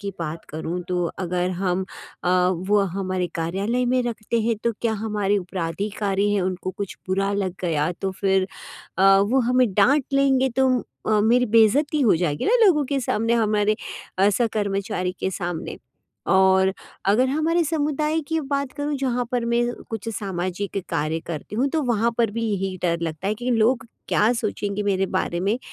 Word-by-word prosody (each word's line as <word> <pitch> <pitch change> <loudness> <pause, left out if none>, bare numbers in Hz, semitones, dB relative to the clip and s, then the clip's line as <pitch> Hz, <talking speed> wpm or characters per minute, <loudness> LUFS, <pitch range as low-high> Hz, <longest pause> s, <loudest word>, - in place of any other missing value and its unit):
की 200 -1 -4
बात 165 0 -5
करूँ, 160 +3 -4
तो 180 -1 0
अगर 180 0 -1
हम 185 -1 0 0.4
अ, 180 - +1 0.4
वो 205 0 +4 0.2
हमारे 185 -2 -1
कार्यालय 195 +9 -1
में 250 +1 +2
रखते 235 -1 -2
हैं, 225 0 +1
तो 235 - +2
क्या 230 -2 +1
हमारे 205 -2 +1
उपराधिकारी 195 +3 -2
हैं, 205 - +2
उनको 185 0 -2
कुछ 200 0 -6
बुरा 195 +1 +1
लग 195 -3 -1
गया, 155 -3 +1
तो 190 +2 -3
फिर 190 -1 +2 0.5
अ, 195 +1 +6
वो 215 +7 +2
हमें 250 0 +4
डाँट 260 +9 +4
लेंगे, 270 -1 +3
तो 265 +2 +2 0.4
अ, 215 -1 +3
मेरी 245 +3 +4
बेइज्जती 230 +7 +3
हो 230 -9 +5
जाएगी 155 -4 -1
ना 465 - +4
लोगों 315 -7 +4
के 275 +1 -1
सामने, 225 -2 0
हमारे 215 -2 +2 0.4
अ, 195 +2 +5
सह-कर्मचारी 200 -4 -1
के - - 0
सामने। 175 -2 -4 0.6
और 190 0 +4 0.3
अगर 215 +7 +3
हमारे 320 +4 +1
समुदाय 305 0 0
की 320 0 0
बात 280 -1 -2
करूँ 290 0 -1
जहाँ 250 -2 -1
पर 245 -2 0
मैं 235 0 +2 0.3
कुछ 225 0 -4
सामाजिक 195 -1 -3
कार्य 155 +2 -1
करती 170 +5 -6
हूँ, 255 +5 +2
तो 315 +2 0
वहाँ 235 -2 +1
पर 230 -3 +2
भी 230 +1 -3
यही 190 -1 -2
डर 170 -1 +1
लगता 165 +2 -3
है 210 - 0
कि 250 - 0
लोग 240 +3 +2 0.2
क्या 215 +3 +3
सोचेंगे 210 -3 -2
मेरे 195 -1 +1
बारे 175 -2 -1
में? 200 +6 +1
205 Hz, 175 wpm, -23 LUFS, 185-245 Hz, 0.6 s, अ